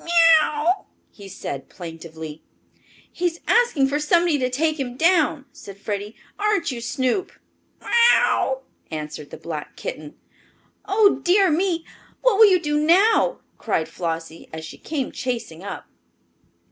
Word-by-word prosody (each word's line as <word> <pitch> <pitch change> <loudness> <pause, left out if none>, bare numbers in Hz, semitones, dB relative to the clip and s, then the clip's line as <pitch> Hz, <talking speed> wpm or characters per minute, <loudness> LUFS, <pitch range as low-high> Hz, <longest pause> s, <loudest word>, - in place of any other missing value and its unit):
meow! - - -10 0.3
meow!" 315 +6 0 0.3
he 200 -2 -12
said 140 -6 -6
plaintively. 160 -2 -9 0.7
"He 355 - -1
is 335 0 -5
asking 470 - +3
for 285 +2 -1
somebody 335 0 +2
to 255 -1 0
take 310 +4 0
him 250 -2 -4
down," 320 -4 +2
said 200 -7 -11
Freddie. 205 +1 -5 0.2
"Aren't 410 -6 +1
you, 240 -2 -6
Snoop?" 260 +7 -1 0.5
"Meow!" 470 - +3 0.3
answered 150 -2 -6
the - - -9
black 155 -3 -7
kitten. 150 -1 -7 0.7
"Oh, 410 0 +3
dear 375 0 +4
me, 335 0 0 0.4
what - - +4
will 440 -2 +9
you 370 -2 +4
do 295 -2 0
now?" 410 +9 +4 0.2
cried 165 -8 -1
Flossie, 165 -1 -5
as 160 0 -7
she - - -11
came 290 -5 -3
chasing 230 -10 -4
up. 200 - -7
280 Hz, 140 wpm, -22 LUFS, -, 0.7 s, will